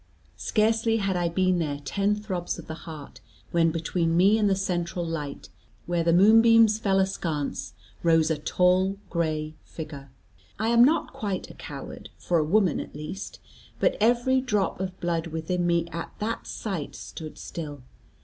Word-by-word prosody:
Scarcely 225 +1 +2
had 195 -3 0
I 175 -1 +1
been 185 +1 +2
there 145 -3 -2
ten 200 +8 +1
throbs 190 -5 -4
of 170 - -9
the 160 - -6 0.2
heart, 150 -3 -10 0.3
when 165 -1 +3
between 165 0 0
me 200 +5 +5
and 205 -2 +3
the 195 - +3
central 175 -2 -2
light, 150 -4 -5 0.4
where 175 -1 0
the 170 - +3
moonbeams 220 +3 +6
fell 195 -3 +2
askance, 165 -6 -2 0.3
rose 165 -1 +3
a 155 - -1
tall 185 +4 +2
gray 155 -2 -1
figure. 145 -4 -8 0.5
I 220 +2 0
am 235 0 +6
not 305 +6 +2
quite 200 -4 -4
a - - -12
coward, 140 -3 -9
for 175 -2 +1
a - - +2
woman 185 +1 +2
at - - -8
least, 155 +7 -7 0.4
but - - +2
every 245 +3 +3
drop 210 -9 0
of 185 -1 -4
blood 170 -1 -1
within 165 +2 -2
me 170 -1 +2
at 170 0 -5
that 220 +2 -3
sight 190 -9 -4
stood 155 -2 -8
still. 145 -5 -7
175 Hz, 165 wpm, -26 LUFS, 165-205 Hz, 0.5 s, moonbeams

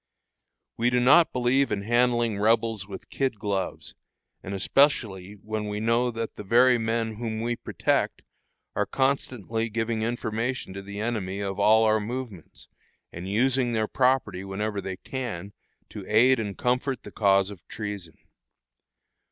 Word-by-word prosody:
We 120 +1 +2
do 125 0 +2
not 145 +7 +6
believe 125 +2 +2
in 100 -1 -1
handling 120 -1 +2
Rebels 110 -2 +1
with 100 - -10
kid 130 -5 -1
gloves, 100 -2 -3 0.5
and 100 +1 -5
especially 100 -4 +2
when 105 +1 -5
we 105 0 -3
know 115 +3 +2
that 115 -1 -5
the - - -6
very 120 +4 +5
men 115 -1 -1
whom 110 -1 -3
we 120 +1 -1
protect - - -1 0.5
are - - 0
constantly 120 -4 -1
giving 115 0 -1
information 115 -1 -2
to 100 - -6
the 100 +1 -8
enemy 105 -4 -2
of 100 -1 -3
all 110 +2 +5
our 110 0 +3
movements, 110 -5 -7 0.5
and 90 +3 -6
using 125 +3 +1
their 110 -1 0
property 125 -8 +1
whenever 100 +1 -3
they 95 -1 -5
can 100 -6 -5 0.4
to 105 - -7
aid 125 +4 +5
and 105 -3 -4
comfort 125 +1 -1
the - - -10
cause 100 -1 +3
of 100 - -13
treason. 105 -6 -6
110 Hz, 150 wpm, -26 LUFS, 100-120 Hz, 0.5 s, not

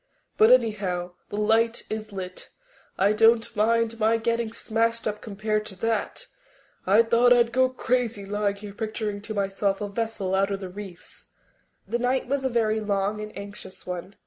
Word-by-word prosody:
But, 220 - +6
anyhow, 200 -8 +2 0.2
the 205 - -5
light 225 +2 +2
is 215 0 -5
lit. 185 -2 -6 0.5
I 200 +2 +3
don't 225 +1 +4
mind 230 +1 +2
my 225 +1 +3
getting 230 0 -1
smashed 230 +1 -1
up 210 0 -3
compared 215 0 -2
to 190 - -8
that. 225 +2 -2 0.6
I 210 +4 +6
thought 235 +2 +4
I'd 240 -1 +5
go 260 +1 +3
crazy 245 -4 -1
lying 205 0 -1
here 200 0 -9
picturing 215 -1 -3
to 215 +1 -6
myself 195 0 0
a 205 - -3
vessel 205 -2 -2
out 195 +1 +2
on 200 - -1
the 190 -2 -7
reefs." 190 -2 -10 0.6
That 235 +4 -1
night 255 +1 +1
was 275 +1 -1
a 265 - +1
very 220 -2 +1
long 205 0 -1
and 215 0 -6
anxious 200 -2 -9
one. 180 +2 -6
215 Hz, 170 wpm, -26 LUFS, 200-230 Hz, 0.6 s, But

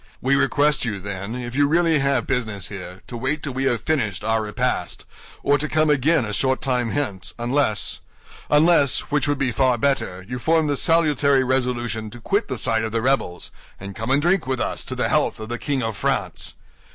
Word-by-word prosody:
We 135 +2 +2
request 145 +1 +2
you, 105 -5 -2
then, 100 +3 -5
if 120 -1 -5
you 145 +1 +3
really 165 0 +3
have 140 0 +1
business 110 -6 -2
here, 95 -2 -9
to 125 - -8
wait 135 +5 -2
till 140 - -3
we 135 +1 -2
have 120 -4 0
finished 115 - -1
our 110 0 +1
repast, 105 -2 -2 0.4
or 145 0 +3
to 155 - -1
come 155 -1 +2
again 150 0 +2
a 105 - -5
short 130 +4 +1
time 125 -3 0
hence; 115 -9 -3
unless, 120 -2 0 1.1
which 145 -1 +1
would 145 0 +1
be 135 -2 0
far 130 0 +2
better, 110 -8 -1
you 125 +2 -5
form 160 +4 +2
the 145 -1 0
salutary 145 -4 +3
resolution 120 -4 -1
to 120 - -11
quit 200 - 0
the 130 - -3
side 115 -1 +1
of 110 - -3
the 115 - 0
rebels, 130 -10 -1 0.3
and 100 0 -8
come 110 +1 -5
and 140 +2 +2
drink 175 -4 +2
with 130 -2 -1
us - - -2
to - - -5
the - - 0
health - - +1
of 110 0 -7
the 120 - -4
King 140 -4 -1
of 115 -1 -3
France." - - -2
130 Hz, 205 wpm, -22 LUFS, 110-145 Hz, 1.1 s, you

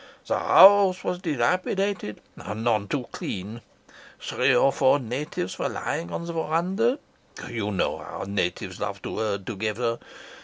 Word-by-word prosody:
The - - 0
house 195 -1 +7
was 180 - -2
dilapidated 180 - -1
and 105 +7 -6
none 110 -4 +1
too 130 +2 -2
clean. 105 +5 -6 0.6
Three - - +1
or 135 - +5
four 135 +1 +4
natives 125 -7 -4
were - - 0
lying 85 +1 -3
on 170 - -4
the 170 - -5
verandah. 180 - 0 0.5
You 115 -4 -3
know 95 - -1
how - - -7
natives 100 -3 -2
love - - -4
to - - -4
herd 100 -3 -2
together. 115 +2 -2
120 Hz, 145 wpm, -25 LUFS, -, 0.6 s, house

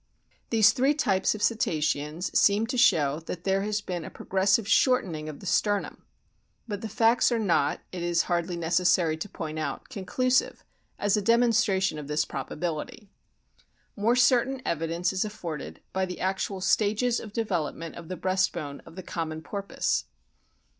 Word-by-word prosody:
These 220 -2 +6
three 270 +3 +2
types 205 -10 +1
of 210 - -5
Cetaceans 155 -6 -1
seem 205 +2 +4
to 250 - -4
show 155 - +3
that 175 -1 -5
there 195 0 +1
has 210 +1 -1
been 180 -4 -4
a - - -7
progressive 195 +3 +1
shortening 180 - +2
of 150 - -9
the - - -10
sternum. 205 +1 0 0.6
But 205 -2 -4
the 220 - -5
facts 225 +4 +3
are 235 - +2
not, 170 -9 +1
it 180 - -5
is 170 0 +1
hardly 175 0 -1
necessary 170 -1 +2
to 180 +6 -6
point 155 -3 -5
out, 155 - -4
conclusive 255 +4 0 0.3
as 205 0 +1
a - - +1
demonstration 215 -6 +2
of 145 - -8
this 150 +1 0
probability. 165 - -5 0.8
More 225 +4 +2
certain 255 +1 +3
evidence 170 +2 -1
is 190 - 0
afforded 165 - -6
by 190 0 0
the 180 - -7
actual 190 +1 -2
stages 215 +5 +2
of 215 - -9
development 175 -7 -2
of 170 -1 -10
the 185 - -5
breast 190 0 +1
bone 140 -1 -6
of - - -13
the 185 - -7
common 160 -2 -4
Porpoise. 200 +2 -2
190 Hz, 160 wpm, -27 LUFS, 165-215 Hz, 0.8 s, These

